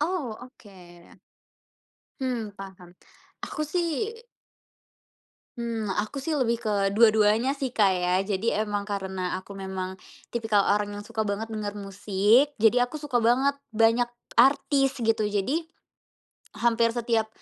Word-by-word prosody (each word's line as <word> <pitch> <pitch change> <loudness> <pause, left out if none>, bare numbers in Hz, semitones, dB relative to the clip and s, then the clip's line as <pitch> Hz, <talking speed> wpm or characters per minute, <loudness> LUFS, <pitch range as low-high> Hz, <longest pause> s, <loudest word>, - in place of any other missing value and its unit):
Oh, 300 -8 -2
oke. 185 -9 -16 1.0
Hmm, 245 -5 -2
paham. 190 -2 -10 0.6
Aku 305 - -3
sih 345 +7 -1 1.5
Hmm, 230 -3 -3
aku 215 +6 -2
sih 310 +1 -1
lebih 235 -3 0
ke 200 -3 0
dua-duanya 220 +4 +4
sih, 265 -3 -3
Kak, 210 -5 +4
ya. 180 0 0
Jadi 200 +3 -1
emang 205 -1 -1
karena 190 -3 -3
aku 195 +1 -11
memang 190 -1 -5 0.3
tipikal 225 -3 +1
orang 205 0 +1
yang 205 0 -7
suka 220 0 -2
banget 210 +2 -3
denger 210 -2 -4
musik, 205 +7 +2
jadi 245 +2 +5
aku 250 - -10
suka 280 -5 0
banget 260 +5 +2 0.2
banyak 225 +2 +3 0.3
artis 270 +2 +4
gitu. 225 -1 +2
Jadi, 210 - -1 0.9
hampir 230 0 +2
setiap 230 -2 0
220 Hz, 125 wpm, -26 LUFS, 200-245 Hz, 1.5 s, jadi